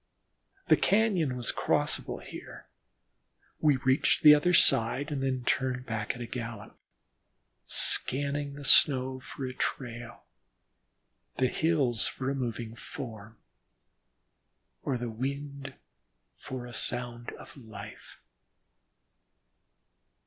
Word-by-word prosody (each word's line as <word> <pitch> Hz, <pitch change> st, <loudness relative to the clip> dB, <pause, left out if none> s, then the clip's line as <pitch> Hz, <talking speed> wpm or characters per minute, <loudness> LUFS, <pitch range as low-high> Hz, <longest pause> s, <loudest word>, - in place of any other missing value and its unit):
The -, -, +6 dB
cañon 190 Hz, -, +2 dB
was 120 Hz, -, 0 dB
crossable -, -, -1 dB
here; -, -, -10 dB, 0.9 s
we 150 Hz, -2 st, +4 dB
reached 130 Hz, +1 st, +2 dB
the 150 Hz, -1 st, +11 dB
other 150 Hz, +4 st, +3 dB
side 140 Hz, -2 st, +3 dB
and 140 Hz, -2 st, -2 dB
then 130 Hz, -2 st, -1 dB
turned 125 Hz, 0 st, 0 dB
back 110 Hz, -3 st, -3 dB
at 120 Hz, -, -8 dB
a -, -, -3 dB
gallop, 115 Hz, -3 st, -7 dB, 0.9 s
scanning 140 Hz, +1 st, +2 dB
the 145 Hz, 0 st, -9 dB
snow 130 Hz, -2 st, +4 dB
for 130 Hz, +2 st, -7 dB
a 130 Hz, -, -5 dB
trail, 120 Hz, -2 st, -4 dB, 1.1 s
the 130 Hz, 0 st, +2 dB
hills 140 Hz, -9 st, +2 dB
for 130 Hz, +1 st, -3 dB
a -, -, -2 dB
moving 115 Hz, -3 st, -4 dB
form, 110 Hz, -3 st, -9 dB, 1.4 s
or 130 Hz, -, -1 dB
the 120 Hz, -1 st, -4 dB
wind 140 Hz, +4 st, -5 dB, 0.6 s
for 130 Hz, -2 st, -7 dB
a 120 Hz, -, -10 dB
sound 120 Hz, 0 st, -3 dB
of -, -, -13 dB
life. 110 Hz, -5 st, -11 dB
130 Hz, 110 wpm, -29 LUFS, 120-140 Hz, 1.4 s, the